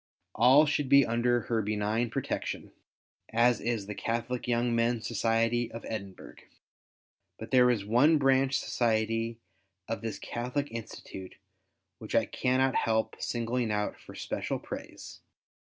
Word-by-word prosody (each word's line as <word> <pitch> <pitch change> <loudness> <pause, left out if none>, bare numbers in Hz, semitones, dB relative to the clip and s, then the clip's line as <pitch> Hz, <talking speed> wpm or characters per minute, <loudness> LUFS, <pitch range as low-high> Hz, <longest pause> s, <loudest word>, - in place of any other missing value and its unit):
All 130 +7 +6
should 145 -2 -1
be 140 0 +7
under 120 +1 +1
Her 115 0 -1
benign 105 +3 -1
protection, - - -4 0.6
as 120 0 +3
is 115 -2 -1
the 105 - -5
Catholic 115 +4 -3
Young 120 0 +1
Men's 115 -1 +1
Society 115 +1 +1
of 115 - -8
Edinburgh. 100 -4 -7 1.0
But 110 +1 -9
there 125 -1 +6
is 110 -5 0
one 135 +9 +4
branch 135 -1 +3
society 115 0 0 0.5
of 115 - -3
this 115 -1 -4
Catholic 125 +4 -3
Institute 105 -4 -8 0.6
which - - -6
I - - +4
cannot 130 +1 +1
help 110 0 0
singling 120 -1 -1
out 105 0 -1
for - - -14
special - - -3
praise. - - -9
115 Hz, 135 wpm, -29 LUFS, 110-125 Hz, 1.0 s, be